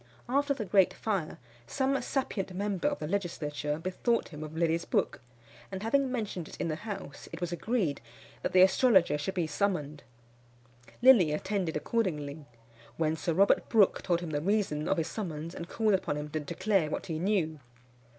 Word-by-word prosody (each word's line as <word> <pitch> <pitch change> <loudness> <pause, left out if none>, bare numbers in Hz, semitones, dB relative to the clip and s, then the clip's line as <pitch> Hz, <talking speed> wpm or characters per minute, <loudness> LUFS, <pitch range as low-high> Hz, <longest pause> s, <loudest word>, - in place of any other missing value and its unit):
After 280 +3 +1
the 225 -5 -4
great 190 0 +4
fire, 195 -8 -2 0.3
some 270 0 0
sapient 195 -8 -2
member 200 +3 -1
of 290 -1 0
the - - -5
legislature 150 -5 -2
bethought 185 +8 -1
him 150 -2 -8
of 155 +1 -8
Lilly's 165 0 +1
book, 155 - -1 0.5
and 190 +1 -5
having 270 +3 +2
mentioned 205 -9 -3
it - - -11
in - - -1
the 155 - -1
house, 205 -10 -7
it 165 - -7
was 175 -1 -3
agreed 175 - -1 0.4
that - - -2
the 185 0 +7
astrologer 190 - +4
should 190 +6 -3
be 175 -3 +1
summoned. 155 -3 -1 1.0
Lilly 230 -12 +7
attended 180 +1 -1
accordingly, 150 -6 -2 0.5
when 160 -1 +1
Sir 160 0 -2
Robert 200 +3 +3
Brook 215 -4 +4
told 175 -2 0
him 170 -3 -5
the 145 -1 -1
reason 180 -5 0
of 195 - +1
his 165 - 0
summons, 165 -5 -5
and 170 0 -7
called 220 -2 +1
upon 185 -6 0
him 150 0 -5
to 155 +1 -2
declare 165 +3 0
what - - -3
he 160 -4 -3
knew. 170 -5 0
180 Hz, 180 wpm, -30 LUFS, 155-210 Hz, 1.0 s, the